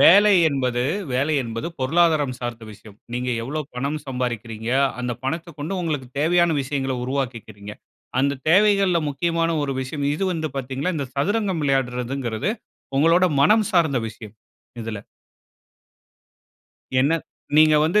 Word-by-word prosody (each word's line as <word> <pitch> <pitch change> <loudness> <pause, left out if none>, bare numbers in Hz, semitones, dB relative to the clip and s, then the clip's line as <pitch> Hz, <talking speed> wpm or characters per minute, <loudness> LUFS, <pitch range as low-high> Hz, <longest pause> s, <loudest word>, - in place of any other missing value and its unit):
வேலை 205 +4 +8 0.2
என்பது 125 -4 0 0.3
வேலை 140 +5 +1
என்பது 115 +4 -5
பொருளாதாரம் 150 -2 +2
சார்ந்த 120 -2 -5
விஷயம். 105 0 -15 0.2
நீங்க 125 +1 -2
எவ்வளவு 145 +3 -4
பணம் 140 +5 -2
சம்பாரிக்கிறீங்க? 120 -3 -3 0.3
அந்த 125 -1 -2
பணத்த 165 +4 -3
கொண்டு 155 +7 -3
உங்களுக்கு 150 -6 -2
தேவையான 170 +1 +3
விஷயங்கள 135 -1 -2
உருவாக்கிகிறீங்க. 115 -6 -4 0.5
அந்த 140 0 0
தேவைகள்ல்ல 195 -1 +4
முக்கியமான 165 +3 0
ஒரு 135 -1 -2
விஷயம், 140 +2 -3
இது 195 - -1
வந்து 160 -2 -2
பாத்தீங்கன்னா, 135 +7 -2
இந்த 140 -3 -2
சதுரங்கம் 190 +1 0
விளையாடுறதுங்கிறது, 125 - -1 0.5
உங்களோட 165 +4 +5 0.2
மனம் 215 +7 +4
சார்ந்த 160 -8 +3
விஷயம், 110 -1 -11 0.5
இதுல. 110 -2 -5 2.0
என்ன 145 +5 +3 0.4
நீங்க 155 0 +7
வந்து 175 +7 +3
140 Hz, 125 wpm, -23 LUFS, 125-165 Hz, 2.0 s, வேலை